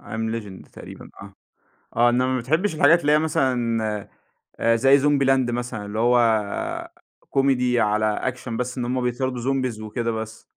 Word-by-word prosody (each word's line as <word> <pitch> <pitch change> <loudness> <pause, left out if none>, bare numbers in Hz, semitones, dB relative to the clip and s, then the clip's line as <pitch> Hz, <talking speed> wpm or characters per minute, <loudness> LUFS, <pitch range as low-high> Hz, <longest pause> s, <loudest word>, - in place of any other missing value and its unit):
I - - -9
am 110 0 -2
legend 100 -5 -8
تقريبًا - - -12
آه، - - -12 0.6
آه 120 +1 +4
إنما 125 +1 +1
ما 130 - 0
بتحبش 160 - 0
الحاجات 160 +3 +5
اللي 145 - +2
هي 150 - +5
مثلًا، 115 -8 -1 0.7
زي 135 +4 +5
zombie 145 -1 +2
land 130 -2 +2
مثلًا 120 -3 -4
اللي 105 +2 -5
هو 120 +2 +3 1.2
كوميدي 125 -3 +2
على 105 -1 +1
أكشن 120 +2 -3
بس 125 +1 -4
إن 125 - -2
هُم 125 +1 -1
بيطاردوا 125 0 -2
zombies 130 -3 -1
وكده 115 +2 -3
بس؟ 110 0 -6
125 Hz, 165 wpm, -23 LUFS, 115-135 Hz, 1.2 s, الحاجات